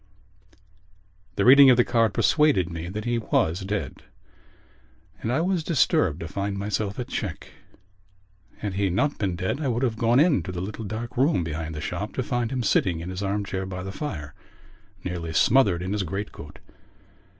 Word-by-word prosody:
_ - - -25 0.8
The 100 - +1
reading 135 +2 +9
of 125 - +6
the 120 - +5
card 115 -2 +2
persuaded 145 - +2
me 85 +1 -5
that 105 +3 -5
he 120 -1 0
was 85 -5 0
dead 100 +1 -4 1.2
and 115 - -2
I 135 +6 +1
was 180 -1 0
disturbed 95 - +2
to 85 - -4
find 100 +2 -3
myself 100 0 -2
at 125 - -4
check. 100 - -5 1.1
Had 105 -2 -4
he 100 0 0
not 140 +11 0
been 95 -4 -1
dead 95 - -2
I 145 - -1
would 120 0 0
have 115 -4 -1
gone 120 +2 +3
into 150 - +2
the 90 - -5
little 105 +4 -5
dark 110 +4 -6
room 135 - +3
behind 80 0 -4
the 75 - -5
shop - - -4
to - - -1
find 120 -2 -2
him 130 -2 -1
sitting 90 -5 +2
in 85 +3 -6
his 95 +1 -5
arm 100 +1 -1
chair 95 -1 -4
by 90 -1 -5
the 95 - -5
fire, 85 - -6 0.7
nearly 85 -2 -4
smothered 100 -5 +3
in 95 +2 -2
his 105 - 0
great 95 +3 -4
coat. 75 0 -11
100 Hz, 190 wpm, -25 LUFS, 90-120 Hz, 1.2 s, reading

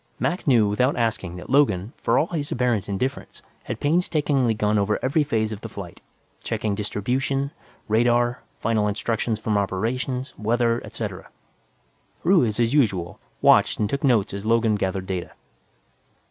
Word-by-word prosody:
Mac 175 -1 -2
knew 115 -6 +5
without 125 +7 +1
asking 110 -7 -1
that 90 +6 -9
Logan, 115 -7 +2
for - - +2
all - - +3
his 155 -4 -4
apparent 120 -5 0
indifference, 130 +8 -4 0.2
had - - -4
painstakingly 145 -6 +1
gone 105 0 +1
over 105 +1 +1
every 145 +4 +2
phase 110 -7 -1
of 105 -1 -6
the 115 - -7
flight, 95 -4 -9 0.4
checking 105 -2 -1
distribution, 130 +7 -1 0.4
radar, 120 +2 +2 0.2
final 110 -2 +1
instructions 110 +2 -1
from 105 -1 0
Operations, 125 +7 -2
weather, 115 +2 +1
et - - -9
al. - - -4 1.0
Ruiz, 130 - +3
as 120 +1 +2
usual, 95 - +1 0.2
watched - - +5
and 105 - +1
took 140 +7 -3
notes 120 -9 +2
as 100 0 -5
Logan 115 0 +2
gathered 95 -2 -1
data. 95 -2 -4
115 Hz, 150 wpm, -24 LUFS, 105-130 Hz, 1.0 s, knew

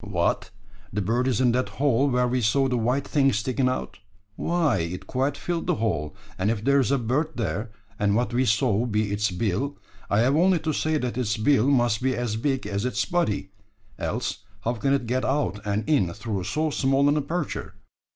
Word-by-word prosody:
"What! 90 -5 0 0.4
the 105 - -2
bird 115 +6 0
is 125 -5 +1
in 125 -2 +4
that 125 +2 0
hole 140 0 +3
where 125 -1 +2
we 125 +1 0
saw 135 +5 +3
the 130 - 0
white 125 +4 0
thing 135 -2 +3
sticking 125 +4 0
out? 130 - -4 0.4
Why, 165 - +1
it 85 +2 -4
quite 135 +2 -1
filled 175 -1 -3
the - - +2
hole, 95 -7 -2 0.2
and 95 +3 +1
if 110 -2 -1
there's 140 -2 +3
a 140 - +3
bird 135 +7 -1
there, 110 0 -2 0.3
and 100 0 +2
what 120 0 0
we 130 +2 +2
saw 115 0 +2
be 105 -2 0
its 105 +1 +1
bill, 105 +9 -2 0.3
I 105 - +3
have 130 +4 +3
only 180 +3 +4
to 155 -1 -1
say 155 +1 0
that 125 -3 -2
its 110 -3 0
bill 125 +2 +3
must 120 -6 +2
be 130 0 +1
as 120 -3 -2
big 135 +2 -1
as 100 0 -2
its 125 - 0
body 105 - -1 0.5
else 115 -1 -2 0.2
how 115 +4 0
can 135 +4 0
it 140 -3 0
get 125 +2 -1
out 135 -6 0
and 105 +1 -1
in 100 - +2
through 105 -3 -4
so 155 0 0
small 135 0 +2
an 145 - +3
aperture? 150 -4 -3
125 Hz, 205 wpm, -25 LUFS, 105-140 Hz, 0.5 s, in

